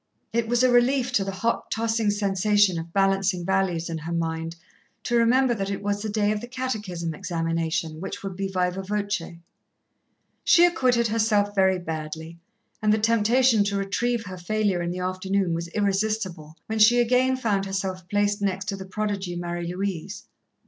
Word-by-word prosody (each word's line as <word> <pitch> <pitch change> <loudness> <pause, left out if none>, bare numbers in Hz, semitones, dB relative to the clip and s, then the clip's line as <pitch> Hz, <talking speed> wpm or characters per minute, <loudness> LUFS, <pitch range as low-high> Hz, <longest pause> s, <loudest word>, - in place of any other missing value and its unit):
It 230 -1 +1
was 240 +2 +2
a 255 - +5
relief 250 +1 +3
to 210 -5 +2
the 195 - -4
hot, 225 +5 -2
tossing 225 -1 0
sensation 205 -2 +2
of 165 +1 -8
balancing 195 -1 +1
values 190 -3 0
in 165 -2 -4
her 165 +2 -6
mind, 165 0 -2 0.5
to 240 - -1
remember 240 +2 +4
that 195 -3 -3
it 200 0 -4
was 205 0 -1
the 220 - -3
day 210 0 +1
of 210 -1 -2
the 240 - -7
Catechism 210 -10 -3
examination, 165 -1 -2
which 190 - -6
would 195 -2 -5
be 195 +1 -2
viva 185 0 -1
voce. 205 -3 -3 1.1
She 345 - +6
acquitted 250 -9 +2
herself 210 -2 +2
very 190 -2 +3
badly, 160 0 -6 0.4
and 215 -1 +3
the 215 - +4
temptation 230 +1 +3
to 200 0 -1
retrieve 225 +4 -1
her 185 -1 -8
failure 200 0 0
in 170 - -2
the 180 - -4
afternoon 185 0 -1
was 170 +1 -3
irresistible, 195 -5 -1
when 220 0 -3
she 240 +3 +6
again 255 +2 +3
found 205 -6 0
herself 190 -2 -4
placed 205 +1 +1
next 195 -1 -1
to 195 - -1
the 190 -1 -8
prodigy 195 -2 -3
Marie 175 0 -4
Louise. 195 0 -4
200 Hz, 175 wpm, -25 LUFS, 180-220 Hz, 1.1 s, She